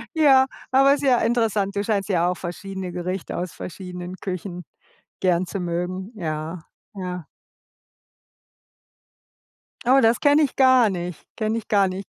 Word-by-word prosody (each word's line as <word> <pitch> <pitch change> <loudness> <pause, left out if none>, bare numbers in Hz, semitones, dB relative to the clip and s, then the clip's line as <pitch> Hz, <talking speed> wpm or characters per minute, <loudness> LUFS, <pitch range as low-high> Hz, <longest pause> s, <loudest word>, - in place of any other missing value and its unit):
Ja, 275 -4 +6 0.3
aber 275 +1 +6
ist 290 - -7
ja 260 -3 +4
interessant. 220 -4 +1
Du 200 - 0
scheinst 205 -2 -1
ja 175 -2 +2
auch 180 - -2
verschiedene 185 +1 -6
Gerichte 180 +1 -4
aus 175 0 -3
verschiedenen 180 0 -7
Küchen 180 -1 -5 0.6
gern 180 -1 +2
zu 195 - -5
mögen. 180 +3 -3
Ja, 160 -2 -4 0.4
ja. 180 -3 -5 2.6
Oh, 265 +2 +6
das 225 0 +4
kenne 290 +1 +4
ich 280 - -1
gar 260 -4 +6
nicht. 180 -3 -5
Kenne 220 0 0
ich 225 - -6
gar 200 -2 +4
nicht. 190 +1 -5
195 Hz, 145 wpm, -23 LUFS, 180-230 Hz, 2.6 s, Ja